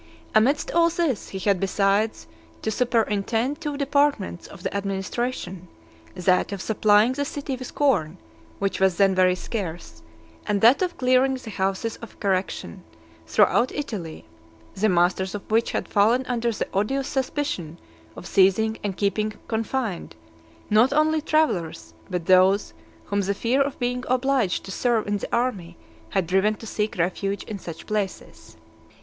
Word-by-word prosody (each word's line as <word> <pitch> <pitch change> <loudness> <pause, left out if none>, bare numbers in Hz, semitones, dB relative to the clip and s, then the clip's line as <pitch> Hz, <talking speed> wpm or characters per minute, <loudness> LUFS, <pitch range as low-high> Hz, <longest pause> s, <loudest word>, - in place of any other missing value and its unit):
Amidst 255 +7 +3
all 335 0 +4
this, 325 - -1
he 195 - -6
had 195 -1 +1
besides 195 - +1 0.4
to 220 - 0
superintend 230 +3 0
two 295 -3 -3
departments 280 -10 0
of 190 -3 -13
the - - -3
administration, 195 -1 -3 0.5
that 180 +2 +2
of 200 - -4
supplying 215 +3 +3
the 285 +2 -2
city 280 -1 -4
with 255 0 -9
corn, 190 - +1 0.4
which 195 - -2
was 190 -2 +3
then 195 -1 +4
very 185 -1 +3
scarce, 175 - -6 0.5
and 205 -1 +1
that 240 +8 +6
of 360 -2 -1
clearing 255 +1 +3
the 255 -4 -8
houses 195 +3 -2
of 230 - -12
correction 190 - -2 0.4
throughout 235 - +3
Italy, 205 - -5 0.5
the 215 +3 +1
masters 185 +2 +1
of 205 - -6
which 225 +1 +2
had - - -2
fallen 225 +5 +3
under 240 -1 -1
the 215 - -3
odious 260 +8 0
suspicion 255 - -3 0.4
of - - -10
seizing 195 +4 +3
and 195 -3 -3
keeping 210 +1 0
confined, 225 - -3 0.6
not 225 +5 +5
only 310 +2 +2
travellers, 175 - 0 0.2
but 180 -2 -3
those 185 +2 +4 0.3
whom 200 0 0
the 200 +1 -1
fear 245 +6 +1
of 275 0 -1
being 250 +1 -2
obliged 255 -5 +1
to 195 - -8
serve 235 +2 +1
in 205 0 -1
the - - -6
army 235 - -1 0.3
had 190 - 0
driven 190 +5 +2
to 225 - -11
seek 215 -2 -2
refuge 195 +3 -1
in 210 -3 -7
such 165 -3 -9
places. 210 -3 -5
210 Hz, 155 wpm, -24 LUFS, 190-255 Hz, 0.6 s, that